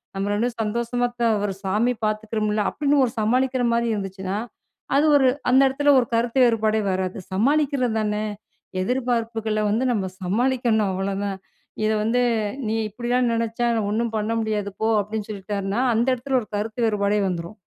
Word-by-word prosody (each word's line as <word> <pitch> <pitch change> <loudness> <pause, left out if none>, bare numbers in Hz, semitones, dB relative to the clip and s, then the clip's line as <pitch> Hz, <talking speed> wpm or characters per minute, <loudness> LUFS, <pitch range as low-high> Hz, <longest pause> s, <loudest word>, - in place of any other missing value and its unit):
நம்ம 195 +1 -1
2 210 +3 +1
பேரும் 230 -2 -4
சந்தோஷமா 235 +3 -1
தா 235 - +4 0.2
ஒரு 195 -2 -3
சாமி 215 +6 +1
பார்த்துக்கிறோம்ல." 215 -1 -1
அப்டின்னு 285 -1 +2
ஒரு 235 - -4
சமாளிக்கிற 255 +3 +1
மாரி 235 0 +1
இருந்துச்சுன்னா, 195 0 -4 0.6
அது 295 - +4
ஒரு 265 - +4 0.2
அந்த 265 +2 +6
இடத்தில 285 +2 +3
ஒரு 240 - -4
கருத்து 235 +3 +1
வேறுபாடே 220 -2 +2
வராது. 185 0 -2 0.2
சமாளிக்கிறது 270 +2 +2
தானே. 210 0 -1 0.6
எதிர்பார்ப்புகள 230 -2 -1
வந்து 225 +4 +1
நம்ம 195 -4 -1 0.2
சமாளிக்கணும் 225 +2 +1
அவ்வளோதான். 195 +1 -2 0.5
இத 215 - +2
வந்து 235 +3 +2 0.5
"நீ 220 - 0 0.2
இப்படிலாம் 240 +3 0
நினச்சா 230 +1 -1 0.2
ஒண்ணு 220 +3 0
பண்ண 215 +1 -1
முடியாது 210 -2 -2
போ." 220 - +2
அப்படின்னு 210 +1 -5
சொல்லிட்டார்னா. 200 +1 -3 0.2
அந்த 230 +2 +2
இடத்துல 255 +1 0
ஒரு 215 - -10
கருத்து 220 +3 -1
வேறுபாடே 210 -1 +1
வந்துரும். 175 +3 -4
220 Hz, 155 wpm, -23 LUFS, 205-245 Hz, 0.6 s, அந்த